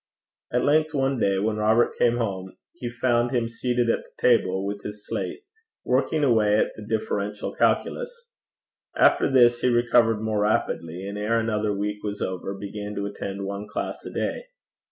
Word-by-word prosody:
At 125 - +1
length 155 +1 +2
one 135 -2 +1
day 100 -3 +2
when 105 +2 0
Robert 110 +3 +3
came 120 0 +2
home 95 -5 -3 0.2
he 120 - -5
found 120 0 +1
him 120 -2 0
seated 120 +1 -1
at - - -2
the - - -20
table, 95 -6 +3
with 100 0 -4
his 105 0 -8
slate, 405 - -4 0.4
working 140 +4 +1
away 110 -5 +4
at - - +1
the - - -10
Differential 105 -1 -3
Calculus. 485 -1 -1 0.7
After - - +4
this 120 -3 +5
he 125 - +3
recovered 120 -2 +3
more 110 -1 -1
rapidly, 95 -4 -1
and 100 +1 -5
ere 110 +3 +1
another 110 -2 0
week 105 +1 -3
was 105 -1 -4
over 95 +1 -3
began 105 +1 -6
to 100 - -2
attend 100 -1 -5
one 100 +1 -5
class - - -4
a - - -7
day. - - -3
110 Hz, 175 wpm, -25 LUFS, 100-120 Hz, 0.7 s, this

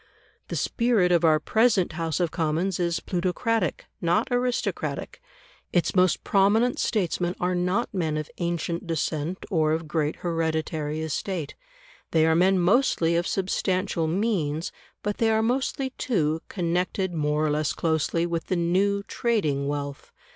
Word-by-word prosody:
The - - -4
spirit 230 -7 +2
of 170 -1 +3
our 155 -2 +5
present 215 0 +2
House 165 -2 -2
of 175 -3 0
Commons 170 +3 -1
is 170 -1 0
plutocratic, 185 - -1 0.2
not 170 0 +2
aristocratic; 245 - -2 0.5
its 175 - +1
most 185 -1 +3
prominent 210 +5 +3
statesmen 180 -4 0
are 180 +1 0
not 180 +7 0
men 160 -5 -1
of 155 -1 -3
ancient 170 0 -2
descent 160 +2 -2
or 155 -3 +2
of 160 0 -2
great 150 -1 0
hereditary 160 -2 -2
estate; 160 0 -3 0.6
they 160 -1 +4
are 160 - +4
men 185 +3 +4
mostly 180 -3 +3
of 170 +1 +1
substantial 185 -2 0
means, 165 -4 -1 0.3
but 205 0 -2
they 225 - +3
are 220 0 +2
mostly, 260 +2 -1
too, 160 -9 0
connected 180 +1 -1
more 150 -1 0
or 150 - +1
less 150 0 0
closely 165 +1 0
with 170 -1 -3
the 185 - 0
new 190 +4 +1
trading 170 - 0
wealth. 145 -1 -4
175 Hz, 145 wpm, -25 LUFS, 160-195 Hz, 0.6 s, our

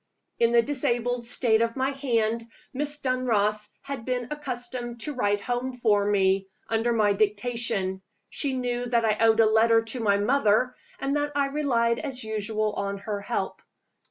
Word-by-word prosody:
In 235 0 +4
the 235 -1 +5
disabled 245 -3 0
state 230 -2 +2
of 230 0 0
my 265 +1 0
hand, 230 -4 -1 0.3
Miss 290 +2 -1
Dunross 215 -6 0
had 275 -4 -5
been 250 0 -2
accustomed 245 -4 -5
to 300 - -2
write 205 -5 0
home 245 +4 -2
for 210 -5 +2
me, 195 -1 +2 0.2
under 225 +1 +1
my 215 -3 +3
dictation: 205 -2 0 0.3
she 280 -3 -2
knew 245 -1 -2
that 235 -1 +2
I 215 -1 +1
owed 225 0 +4
a - - +6
letter 225 +1 +4
to 225 +3 -3
my 200 -3 +2
mother, 235 +2 +2 0.3
and 275 +1 -1
that 290 0 -2
I 280 -1 +1
relied 235 -5 +1
as 265 -5 -4
usual 215 0 -2
on 200 0 -3
her 205 0 -4
help. 200 - -3
235 Hz, 165 wpm, -26 LUFS, 215-255 Hz, 0.3 s, a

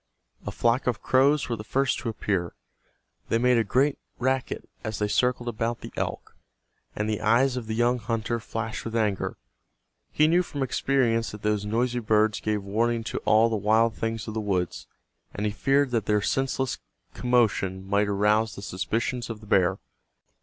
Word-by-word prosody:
A - - -2
flock 120 +3 +1
of 120 -5 -1
crows 140 +3 +3
were 120 - -1
the 105 - -7
first 135 +4 0
to 115 - -3
appear. 95 -5 -2 0.7
They 115 - +3
made 125 0 +3
a - - +3
great 135 +7 +1 0.2
racket 130 +1 -1 0.2
as 110 -2 -3
they 105 - 0
circled 125 +3 +1
about 115 +1 -2
the - - -9
elk, - - -4 0.6
and 105 - -1
the 110 -1 -2
eyes 120 +4 +3
of 120 -3 -5
the 110 - -2
young 120 +2 +2
hunter 115 +1 -2
flashed 115 0 -5
with 115 0 -5
anger. 105 -4 0 0.7
He 155 - +4
knew 175 +3 +4
from 145 -6 -4
experience 125 -3 +1
that 105 - -9
those 105 -1 0
noisy 120 +3 0
birds 110 -1 +2
gave 105 -2 -1
warning 115 +3 0
to - - -3
all 110 +2 +5
the 115 - -1
wild 110 +2 +3
things 115 -1 -3
of 110 - -4
the 110 - -2
woods, 95 -4 -2 0.5
and 105 - -2
he 105 - +1
feared 135 +5 +2
that 115 -4 -1
their 105 -1 +2
senseless 135 -1 -1 0.3
commotion 105 -6 +1
might 100 +1 +2
arouse 105 +2 +2
the 100 - -9
suspicions 115 +6 -2
of 115 -2 -5
the 105 - -14
bear. 95 -2 +3
115 Hz, 180 wpm, -26 LUFS, 105-125 Hz, 0.7 s, all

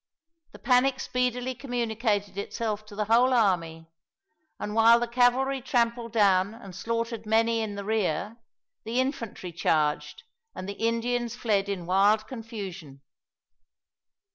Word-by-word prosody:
The - - -11
panic 255 +1 +2
speedily 250 0 -1
communicated 230 -5 -2
itself 215 +1 -4
to 210 - -11
the 210 0 -1
whole 240 +4 +4
army, 170 -7 +1 0.7
and 210 - -4
while 230 +1 +6
the 240 - -1
cavalry 255 +3 +2
trampled 235 -2 0
down 200 -1 +3
and 195 -6 -11
slaughtered 230 +1 -3
many 225 +1 +2
in 210 -2 -4
the 200 0 -6
rear, 215 0 -1 0.5
the 230 +3 -1
infantry 230 - -3
charged, 155 - 0 0.3
and 185 - -6
the 200 - -4
Indians 230 +2 -1
fled 205 -5 0
in 185 -4 -3
wild 205 +4 +3
confusion. 195 - -8
225 Hz, 130 wpm, -27 LUFS, 200-240 Hz, 0.7 s, while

